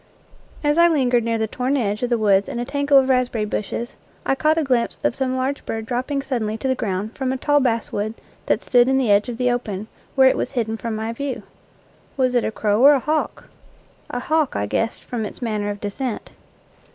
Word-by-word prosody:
As 295 +2 +2
I 340 - +7
lingered 255 -7 +2
near 230 0 0
the 220 - 0
torn 255 +5 -1
edge 210 -3 -1
of 245 - 0
the 240 - +2
woods 200 -2 +3
in - - -4
a 240 - -2
tangle 285 +1 +3
of 265 -1 +5
raspberry 250 -4 +1
bushes, 215 +3 -4 0.3
I - - +2
caught 310 +3 +2
a 325 - +2
glimpse 250 -4 0
of - - +2
some 260 0 -1
large 265 +2 -2
bird 225 0 -4
dropping 255 +4 -2
suddenly 225 -5 -2
to 265 - -3
the 260 - +3
ground 210 -2 -3
from 260 -1 -1
a 265 - -1
tall 290 +2 +3
basswood 225 -4 -1 0.3
that - - +1
stood 245 -1 +4
in 265 0 +3
the 250 -6 +2
edge 205 +3 +3
of 235 - -5
the 250 0 +2
open, 215 -4 -3 0.3
where 265 -1 +6
it - - +3
was - - -2
hidden 225 -3 -1
from 225 0 -4
my 220 +1 -3
view. 275 0 -4 0.7
Was 255 -2 +2
it 245 - +2
a - - 0
crow 210 0 +1
or 285 +1 +9
a 280 - +3
hawk? 305 +4 -2 0.6
A 245 - -3
hawk, 310 +1 +1
I 100 - 0
guessed, 225 - -2
from 235 -3 -4
its 210 - -7
manner 215 -4 -2
of 205 0 -4
descent. 215 +4 -4
245 Hz, 225 wpm, -22 LUFS, 220-265 Hz, 0.7 s, or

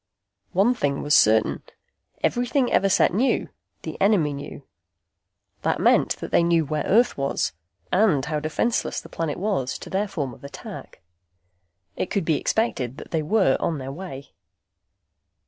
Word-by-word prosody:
One 200 +7 +4
thing 140 - -1
was 145 - +1
certain. 110 0 +4 0.6
Everything 245 +2 +1
Everset 195 -2 +3
knew, 245 +8 +1 0.3
the - - -7
enemy 190 -8 +3
knew. 140 0 -8 1.0
That - - 0
meant - - +3
they - - +1
knew 170 -1 +2
where 150 +1 -2
Earth 235 - +3
was, 140 -9 -1 0.4
and 180 -9 +3
how 150 -1 -1
defenseless 155 +10 -1
the - - -13
planet 160 -3 -3
was 185 -10 -1
to - - -10
their 200 +2 0
form 145 -10 -4
of - - -16
attack. 140 -10 -10 0.9
It - - -3
could 200 -5 -1
be 155 -2 +1
expected 135 - -1
that - - -10
they 160 - 0
were 195 +6 +2
on 165 - -1
their 135 0 -6
way. 140 -4 -8
165 Hz, 145 wpm, -24 LUFS, 140-200 Hz, 1.0 s, One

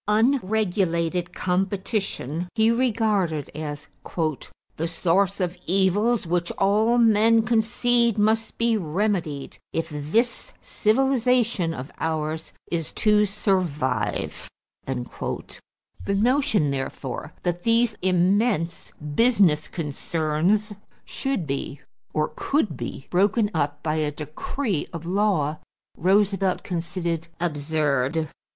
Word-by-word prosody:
Unregulated 195 -7 +1
competition 185 - -2
he 220 0 +4
regarded 215 - +1
as 150 -1 -5 0.9
"the 165 - -2
source 185 +4 +1
of 180 -1 -1
evils 195 +5 +2
which 175 +1 0
all 215 +4 +3
men 225 0 +5
concede 235 +1 +2
must 220 +2 +1
be 230 0 +2
remedied 170 -5 -2
if 165 0 -2
this 225 - -1
civilization 240 -5 +1
of 135 -2 -7
ours 160 0 -2 0.2
is 165 -2 -2
to 210 -1 +3
survive." 150 - -1 0.4
The 125 -2 -2 1.1
notion, 230 - +2
therefore, 135 -1 -4
that 175 -1 -1
these 230 +1 +3
immense 185 0 +1 0.2
business 190 -8 +4
concerns 165 +6 -1 0.3
should 270 - -2
be 140 0 -4 0.3
or 155 0 0
could 250 - 0
be 120 +3 -6
broken 205 +4 +2
up 145 -2 -1
by 155 0 0
a 150 -1 0
decree 155 - -3
of 170 -2 -7
law, 175 -6 +1 0.4
Roosevelt 195 +1 +2
considered 170 -2 -3
absurd. 150 -2 0
185 Hz, 100 wpm, -24 LUFS, 155-220 Hz, 1.1 s, men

